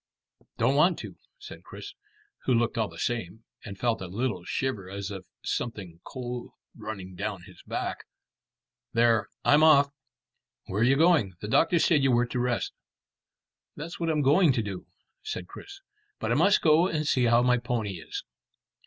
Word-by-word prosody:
"Don't 115 +4 +3
want 160 +5 +4
to," - - -8 0.2
said - - -11
Chris, 405 - -10 0.5
who 130 - +3
looked 115 0 +1
all 110 -2 0
the - - -13
same, 110 -3 -3 0.2
and 100 - -8
felt 115 0 0
a 95 - -5
little 100 -1 -2
shiver 105 -4 -3
as 100 +1 -5
of 95 -3 -8 0.2
something 95 -8 -4
cold 125 -1 -6 0.3
running 105 -4 -7
down 100 -1 -4
his - - -15
back. - - -4 0.9
"There, 115 -1 +3 0.2
I'm 145 +1 +5
off." 145 -3 +6 0.8
"Where 100 +3 -2
are - - +5
you 135 +3 +4
going? 155 - +4
The 105 - -6
doctor 165 - +3
said 160 -2 +3
you 135 - +3
were 120 0 +3
to 125 +1 -3
rest." 120 -1 -1 1.0
"That's 165 +3 -7
what 165 -1 -1
I'm 150 -2 +1
going 150 +2 +5
to 115 -3 0
do," 95 -3 -6 0.3
said 90 - -5
Chris, 395 - -11 0.4
"but - - -2
I - - +4
must 200 - +4
go 160 +2 +5
and 155 -4 -2
see 130 -4 +3
how 120 +1 +4
my 125 0 +3
pony 115 -6 -2
is." - - -6
120 Hz, 175 wpm, -27 LUFS, 105-145 Hz, 1.0 s, off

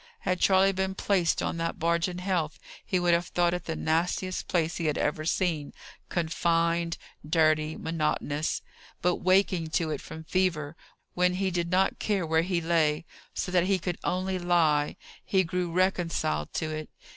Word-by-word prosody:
Had 180 0 0
Charley 195 0 +5
been 190 0 -2
placed 185 -5 +1
on - - -2
that 165 0 -2
barge 170 +1 +1
in 180 -1 -5
health, 180 -4 -1 0.3
he 185 - 0
would 175 -1 +3
have 170 +1 +1
thought 175 0 +1
it 180 -1 -4
the 160 - -3
nastiest 175 +4 -1
place 165 -2 0
he 165 - -1
had 150 - 0
ever 155 +1 -1
seen 160 -4 0 0.4
confined, 170 0 +1 0.3
dirty, 155 0 +2
monotonous. 155 -2 -1 0.4
But 180 0 +2
waking 185 -2 +2
to 160 -2 -1
it 150 - -3
from 160 - -9
fever, 160 -4 0 0.4
when 180 0 +2
he 190 0 0
did 170 -1 -1
not 185 +2 +2
care 200 -5 0
where 160 0 +2
he 175 0 -1
lay, 160 -2 +1 0.3
so 180 - -2
that 180 -1 +3
he 195 0 +2
could 180 -1 -4
only 185 +1 -1
lie, 165 -4 +2 0.3
he 190 -1 +2
grew 180 +1 -2
reconciled 170 - 0
to 155 -1 -1
it. 155 0 -5
170 Hz, 170 wpm, -28 LUFS, 160-185 Hz, 0.4 s, Charley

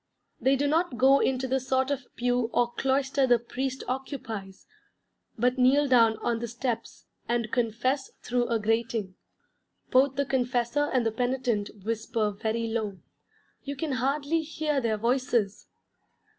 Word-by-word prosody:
They 265 +1 +3
do 280 +2 0
not 315 -3 +1
go 270 +3 +6
into 260 0 0
the 265 +1 +1
sort 260 +1 0
of 275 -3 -3
pew 245 -1 0
or 240 0 +2
cloister 270 +1 +1
the 245 -1 +5
priest 260 +3 -4
occupies, 230 -7 -5 0.7
but 250 +3 +1
kneel 275 +3 +4
down 230 -4 +5
on 235 -1 0
the 235 - -3
steps 235 0 -4 0.2
and 235 -2 0
confess 250 +3 0
through 245 0 0
a 230 - +1
grating. 225 -2 -1 0.8
Both 265 +1 +4
the 280 - 0
confessor 255 +2 0
and 250 -3 +1
the 225 - +2
penitent 245 -3 -1 0.2
whisper 220 -1 -1
very 220 +3 -2
low: 220 -4 -2 0.6
you 280 0 -5
can 305 +1 -3
hardly 280 +5 0
hear 305 -2 -1
their 225 -3 0
voices. 235 -3 0
250 Hz, 145 wpm, -27 LUFS, 230-270 Hz, 0.8 s, go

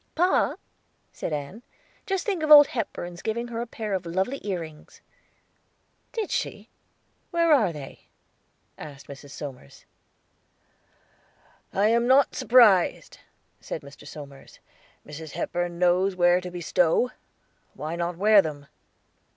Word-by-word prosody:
"Pa," 360 +3 +2 0.6
said - - -5
Ann, 150 +9 -5 0.5
"just 385 -2 -1
think 390 -6 -1
of 310 - -1
Old 295 -1 +10
Hepburn's 175 -8 -5
giving 235 +2 -3
her 230 0 -4
a 240 - -5
pair 215 -2 -5
of 190 -2 -1
lovely 190 +11 -2
ear 190 -4 -2
rings." 155 -2 -12 1.1
"Did 445 -4 -4
she? - - -3 0.6
Where 335 -2 +3
are 220 -11 +3
they?" 145 -4 -11 0.7
asked 145 -2 -10
Mrs. 140 0 -11
Somers. 135 - -10 1.9
"I 205 +2 +2
am 235 +1 +2
not 265 +1 +4
surprised," 225 -7 +4 0.4
said - - -7
Mr. 140 +1 -13
Somers. 140 -2 -11 0.5
"Mrs. 150 0 -9
Hepburn 175 0 -3
knows 180 +2 +2
where 175 0 +3
to 180 - -6
bestow. 175 +5 +1 0.6
Why 155 +2 -5
not 170 0 -3
wear 210 +2 +6
them?" 150 -4 -7
180 Hz, 125 wpm, -25 LUFS, 155-235 Hz, 1.9 s, Old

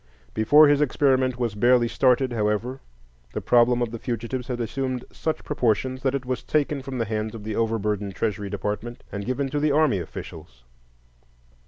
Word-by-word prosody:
Before 145 +8 +6
his 145 0 +3
experiment 130 -3 +2
was 120 -4 -1
barely 120 +3 +4
started, 130 +1 +2
however, 110 +4 -1 0.5
the - - -2
problem 120 0 +3
of 115 - -3
the 115 - -6
fugitives 120 +2 -4
had 125 -2 -3
assumed 125 +2 -3
such 160 - -3
proportions 130 -1 0
that 135 0 0
it 135 -2 -3
was 130 0 -2
taken 150 -2 0
from 130 -1 -6
the 115 - 0
hands 110 +1 -3
of 110 - -8
the 110 0 -4
over 115 0 +1
burdened 100 -2 -2
Treasury 105 -2 -2
Department 105 +4 -4
and 100 +1 -5
given 130 +2 -1
to 145 +2 -1
the 150 +1 +2
army 145 -9 +3
officials. 75 -6 -9
120 Hz, 180 wpm, -24 LUFS, 110-130 Hz, 0.5 s, Before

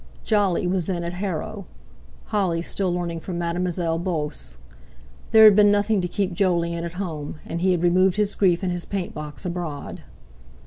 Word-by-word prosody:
Jolly 205 -5 +1
was 180 -2 0
then 175 -2 -2
at 170 +1 -4
Harrow; 190 +1 -4 0.6
Holly 180 -5 0
still 185 0 -1
learning 175 -1 -2
from 175 +1 -5
Mademoiselle 170 -1 -1
Beauce. 150 - -3 0.7
There 220 0 +7
had 215 -2 +9
been 205 0 +6
nothing 205 0 +2
to 180 - -1
keep 190 0 -2
Jolyon 170 -2 0
at 170 0 -5
home, 165 -6 -5
and 170 +1 -4
he 190 - +2
had 175 -2 +1
removed 185 +1 +4
his 210 -1 +1
grief 185 -2 +2
and 185 - 0
his 175 -1 -3
paint 195 -3 -4
box 150 +4 -7
abroad. 170 -5 -5
180 Hz, 175 wpm, -23 LUFS, 170-195 Hz, 0.7 s, had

